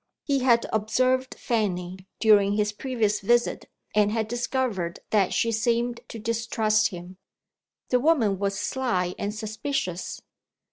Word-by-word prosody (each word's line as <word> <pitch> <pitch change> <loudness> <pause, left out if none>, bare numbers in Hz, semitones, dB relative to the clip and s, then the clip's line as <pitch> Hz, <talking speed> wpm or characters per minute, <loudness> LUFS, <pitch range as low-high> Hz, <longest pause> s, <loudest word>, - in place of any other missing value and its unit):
He 280 -2 +1
had 240 -2 +3
observed 255 +4 +1
Fanny, 185 -5 -2
during 205 -2 +5
his 210 0 +1
previous 215 -2 -1
visit, 240 +4 +1 0.2
and 210 0 +3
had 220 -1 -1
discovered 235 -7 -2
that 205 -4 +3
she 230 - +1
seemed 235 +2 0
to - - -8
distrust 220 -1 +1
him. 180 0 -9 0.7
The 250 - +3
woman 245 - +2
was 200 0 -1
sly 190 -9 -1
and 200 - -2
suspicious. 215 -3 -3
220 Hz, 130 wpm, -26 LUFS, 200-240 Hz, 0.7 s, during